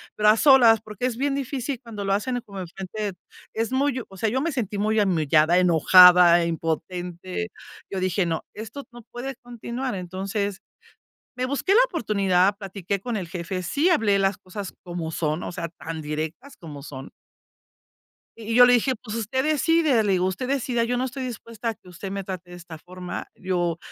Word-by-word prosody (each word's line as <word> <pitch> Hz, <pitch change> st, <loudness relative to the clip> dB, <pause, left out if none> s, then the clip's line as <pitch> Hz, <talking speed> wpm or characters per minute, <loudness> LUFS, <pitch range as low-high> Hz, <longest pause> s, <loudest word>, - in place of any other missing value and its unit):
pero 210 Hz, 0 st, +4 dB
a 215 Hz, -, +5 dB
solas. 245 Hz, -5 st, +6 dB
Porque 215 Hz, +2 st, -6 dB
es 245 Hz, -3 st, -1 dB
bien 275 Hz, +1 st, 0 dB
difícil 270 Hz, -1 st, -3 dB
cuando 215 Hz, -4 st, -6 dB
lo 195 Hz, -, +1 dB
hacen 245 Hz, +5 st, -1 dB
como 200 Hz, -2 st, -7 dB
enfrente 195 Hz, +3 st, -5 dB, 0.4 s
es 225 Hz, +3 st, -2 dB
muy 270 Hz, 0 st, +1 dB
hu 235 Hz, -, -7 dB
o 195 Hz, -, -14 dB
sea, 215 Hz, +4 st, 0 dB
yo 255 Hz, +5 st, 0 dB
me 330 Hz, +1 st, -1 dB
sentí 215 Hz, -6 st, -3 dB
muy 215 Hz, +2 st, +1 dB
humillada, 160 Hz, -3 st, +3 dB
enojada, 180 Hz, 0 st, +7 dB
impotente. 175 Hz, +4 st, -3 dB, 0.4 s
Yo 195 Hz, -, -3 dB
dije: 185 Hz, 0 st, 0 dB
"No, 165 Hz, -2 st, -2 dB
esto 220 Hz, +6 st, -8 dB
no 240 Hz, -, -11 dB
puede 265 Hz, +3 st, -5 dB
continuar". 245 Hz, +2 st, -5 dB
Entonces, 190 Hz, +2 st, -3 dB, 0.8 s
me 255 Hz, -, 0 dB
busqué 280 Hz, +8 st, -1 dB
la 440 Hz, -, +6 dB
oportunidad, 200 Hz, -, +1 dB
platiqué 195 Hz, -1 st, -4 dB
con 240 Hz, +4 st, -4 dB
el 195 Hz, -4 st, -3 dB
jefe, 185 Hz, +1 st, -4 dB
sí 290 Hz, -, +1 dB
hablé 215 Hz, -, +3 dB
las 195 Hz, 0 st, +1 dB
cosas 190 Hz, +1 st, -8 dB
como 175 Hz, -2 st, -5 dB
son, 155 Hz, 0 st, -2 dB
o -, -, -5 dB
sea, 170 Hz, -1 st, -4 dB
tan 160 Hz, 0 st, -7 dB
directas 155 Hz, -, -5 dB
como 150 Hz, -5 st, -10 dB
son. 135 Hz, -2 st, -9 dB, 1.3 s
Y 225 Hz, 0 st, -6 dB
y -, -, +1 dB
yo 245 Hz, 0 st, +9 dB
le 245 Hz, -, +5 dB
dije: 245 Hz, +2 st, +3 dB
"Pues, 220 Hz, -1 st, -8 dB
usted 230 Hz, +4 st, -1 dB
decide", 310 Hz, -4 st, +3 dB
le 200 Hz, -2 st, +2 dB
digo: 180 Hz, -1 st, +2 dB
"Usted 190 Hz, +7 st, -2 dB
decida, 250 Hz, -3 st, 0 dB
yo 245 Hz, +1 st, -1 dB
no 255 Hz, -, 0 dB
estoy 260 Hz, +1 st, -5 dB
dispuesta 230 Hz, -2 st, -5 dB
a -, -, -2 dB
que 190 Hz, -3 st, -18 dB
usted 190 Hz, +2 st, -7 dB
me 195 Hz, 0 st, -4 dB
trate 185 Hz, -2 st, -7 dB
de -, -, -8 dB
esta 170 Hz, -2 st, -10 dB
forma, 180 Hz, +2 st, -7 dB
yo 175 Hz, -3 st, -1 dB
200 Hz, 195 wpm, -24 LUFS, 180-245 Hz, 1.3 s, yo